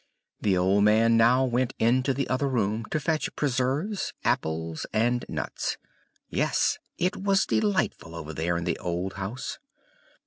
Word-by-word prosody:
The 95 Hz, -3 st, +2 dB
old 95 Hz, +3 st, +3 dB
man 110 Hz, +2 st, +5 dB
now 120 Hz, +3 st, +5 dB
went 125 Hz, 0 st, 0 dB
into 130 Hz, +4 st, +2 dB
the 135 Hz, 0 st, -1 dB
other 135 Hz, +2 st, 0 dB
room 110 Hz, -3 st, 0 dB
to 155 Hz, -, -2 dB
fetch 155 Hz, +1 st, -1 dB
preserves, 145 Hz, -, -1 dB
apples, 80 Hz, 0 st, -1 dB
and 120 Hz, +3 st, +1 dB
nuts -, -, -3 dB, 0.5 s
yes, -, -, +1 dB, 0.2 s
it 180 Hz, +2 st, 0 dB
was 195 Hz, 0 st, +2 dB
delightful 190 Hz, -, 0 dB
over 80 Hz, -1 st, -6 dB
there 85 Hz, +2 st, -1 dB
in 85 Hz, -, -3 dB
the -, -, -1 dB
old 90 Hz, +2 st, -3 dB
house. 100 Hz, +6 st, -5 dB
115 Hz, 145 wpm, -27 LUFS, 95-135 Hz, 0.5 s, man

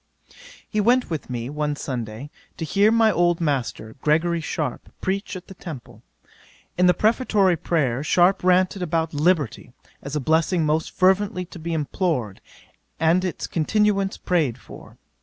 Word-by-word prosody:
'He 215 Hz, -, 0 dB
went 245 Hz, 0 st, +2 dB
with 155 Hz, -5 st, -4 dB
me, 120 Hz, -1 st, -4 dB
one 150 Hz, +1 st, -2 dB
Sunday, 125 Hz, 0 st, -5 dB, 0.3 s
to 160 Hz, -, -3 dB
hear 200 Hz, +7 st, +3 dB
my 225 Hz, -1 st, +4 dB
old 175 Hz, -2 st, +2 dB
Master, 130 Hz, -8 st, -2 dB
Gregory 165 Hz, +2 st, +1 dB
Sharpe, 150 Hz, -4 st, -4 dB
preach 195 Hz, +1 st, -3 dB
at 185 Hz, -, -8 dB
the -, -, -10 dB
Temple. 155 Hz, -, -10 dB, 0.7 s
In 180 Hz, 0 st, +3 dB
the 180 Hz, -, +4 dB
prefatory 210 Hz, -5 st, +2 dB
prayer, 145 Hz, -6 st, -1 dB
Sharpe 180 Hz, +5 st, +3 dB
ranted 185 Hz, +1 st, +2 dB
about 165 Hz, -2 st, -1 dB
Liberty, 150 Hz, -, 0 dB, 0.3 s
as 140 Hz, +2 st, -6 dB
a -, -, +1 dB
blessing 160 Hz, +4 st, +1 dB
most 155 Hz, +1 st, 0 dB
fervently 190 Hz, 0 st, +1 dB
to 175 Hz, -, -12 dB
be 165 Hz, +1 st, -5 dB
implored, 150 Hz, -, -2 dB, 0.6 s
and 165 Hz, +3 st, +3 dB
its 185 Hz, -, -3 dB
continuance 195 Hz, +3 st, +1 dB
prayed 155 Hz, -10 st, 0 dB
for. -, -, -14 dB
170 Hz, 150 wpm, -23 LUFS, 150-185 Hz, 0.7 s, my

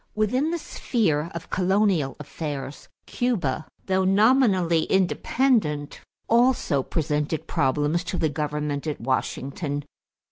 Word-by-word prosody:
= -, -, -42 dB
Within 250 Hz, +8 st, +1 dB
the 345 Hz, -, -1 dB
sphere 170 Hz, -, -1 dB
of 170 Hz, -, -7 dB
colonial 185 Hz, -6 st, +2 dB
affairs, 145 Hz, -1 st, -6 dB, 0.2 s
Cuba, 180 Hz, -, -1 dB, 0.2 s
though 190 Hz, 0 st, +1 dB
nominally 195 Hz, -5 st, +3 dB
independent, 190 Hz, -, +1 dB, 0.3 s
also 235 Hz, -, +3 dB
presented 150 Hz, +1 st, -2 dB
problems 145 Hz, +5 st, +1 dB
to 180 Hz, -, -3 dB
the 160 Hz, -, +2 dB
government 150 Hz, 0 st, -3 dB
at 150 Hz, -, -3 dB
Washington. 140 Hz, +4 st, -2 dB
165 Hz, 110 wpm, -25 LUFS, 145-210 Hz, 0.3 s, nominally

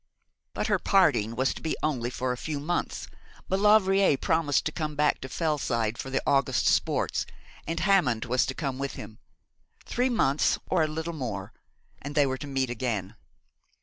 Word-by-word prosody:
But -, -, -1 dB
her -, -, +2 dB
parting 115 Hz, -, +3 dB
was 130 Hz, +2 st, +1 dB
to -, -, -10 dB
be 160 Hz, -, -2 dB
only 130 Hz, -6 st, 0 dB
for 125 Hz, 0 st, -2 dB
a -, -, -1 dB
few 145 Hz, +3 st, -4 dB
months. 175 Hz, +5 st, -2 dB, 0.4 s
Maulevrier 195 Hz, -4 st, +4 dB
promised 160 Hz, -1 st, +1 dB
to 155 Hz, -, 0 dB
come 155 Hz, -2 st, -4 dB
back 150 Hz, 0 st, +2 dB
to 130 Hz, -, -6 dB
Fellside 130 Hz, -8 st, -1 dB
for 135 Hz, -, -5 dB
the 135 Hz, -, -1 dB
August 135 Hz, -2 st, +2 dB
sports, -, -, +1 dB, 0.4 s
and 165 Hz, +1 st, -2 dB
Hammond 170 Hz, -, +2 dB
was 125 Hz, +1 st, +1 dB
to 130 Hz, -, -3 dB
come 135 Hz, -4 st, -3 dB
with 140 Hz, 0 st, -3 dB
him. 105 Hz, 0 st, -10 dB, 0.7 s
Three 250 Hz, +2 st, 0 dB
months 150 Hz, -, +2 dB
or 180 Hz, -, +1 dB
a 155 Hz, -, +2 dB
little 160 Hz, +2 st, -4 dB
more 110 Hz, -10 st, -5 dB, 0.5 s
and 145 Hz, +1 st, -7 dB
they 145 Hz, -2 st, +5 dB
were 130 Hz, -1 st, -2 dB
to 145 Hz, -, -6 dB
meet 135 Hz, -2 st, -1 dB
again. 110 Hz, -4 st, -3 dB
140 Hz, 180 wpm, -27 LUFS, 125-160 Hz, 0.7 s, they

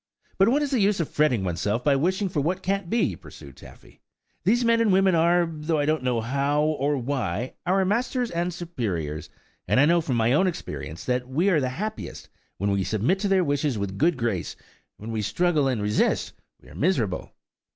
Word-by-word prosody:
"But 195 Hz, +3 st, +5 dB
what 290 Hz, +4 st, +2 dB
is 290 Hz, -, -2 dB
the 260 Hz, -, +2 dB
use 200 Hz, -1 st, +2 dB
of 165 Hz, -, -1 dB
fretting 130 Hz, -9 st, +1 dB
oneself, 100 Hz, +6 st, -1 dB
by 145 Hz, -2 st, +3 dB
wishing 185 Hz, +8 st, 0 dB
for 170 Hz, -5 st, -1 dB
what 180 Hz, +6 st, -1 dB
can't 195 Hz, -2 st, -1 dB
be," 235 Hz, -, +1 dB
pursued -, -, -13 dB
Taffy. -, -, -16 dB, 0.4 s
"These 240 Hz, +4 st, +2 dB
men 230 Hz, 0 st, +3 dB
and 220 Hz, -3 st, +3 dB
women 190 Hz, 0 st, +4 dB
are, 170 Hz, +1 st, +3 dB
though 160 Hz, 0 st, -2 dB
I 145 Hz, -, +1 dB
don't 155 Hz, -1 st, +1 dB
know 125 Hz, -3 st, 0 dB
how, 140 Hz, +5 st, 0 dB
or 150 Hz, -2 st, 0 dB
why, 125 Hz, -4 st, -2 dB
our 190 Hz, +1 st, +3 dB
masters 240 Hz, +4 st, 0 dB
and 175 Hz, +1 st, -1 dB
superiors, 105 Hz, -, -4 dB, 0.4 s
and -, -, +3 dB
I 140 Hz, -, +6 dB
know 170 Hz, +2 st, +3 dB
from 135 Hz, -6 st, -2 dB
my 115 Hz, +1 st, +2 dB
own 190 Hz, +7 st, +3 dB
experience, 90 Hz, -, -6 dB
that 125 Hz, 0 st, -1 dB
we 170 Hz, +9 st, +2 dB
are 165 Hz, -, +3 dB
happiest 205 Hz, +13 st, -5 dB, 0.3 s
when 100 Hz, +2 st, 0 dB
we 100 Hz, -1 st, +1 dB
submit 115 Hz, -, 0 dB
to 205 Hz, -, -1 dB
their 190 Hz, -2 st, +3 dB
wishes 145 Hz, -4 st, 0 dB
with 100 Hz, -1 st, -3 dB
a -, -, -9 dB
good 160 Hz, -, +1 dB
grace; 115 Hz, -8 st, -2 dB, 0.4 s
when 110 Hz, +2 st, -7 dB
we 110 Hz, -1 st, -2 dB
struggle 150 Hz, -, +1 dB
and 120 Hz, -6 st, -1 dB
resist 105 Hz, +1 st, +1 dB, 0.3 s
we -, -, -21 dB
are -, -, -14 dB
miserable." 130 Hz, -, -1 dB
150 Hz, 205 wpm, -25 LUFS, 120-185 Hz, 0.4 s, I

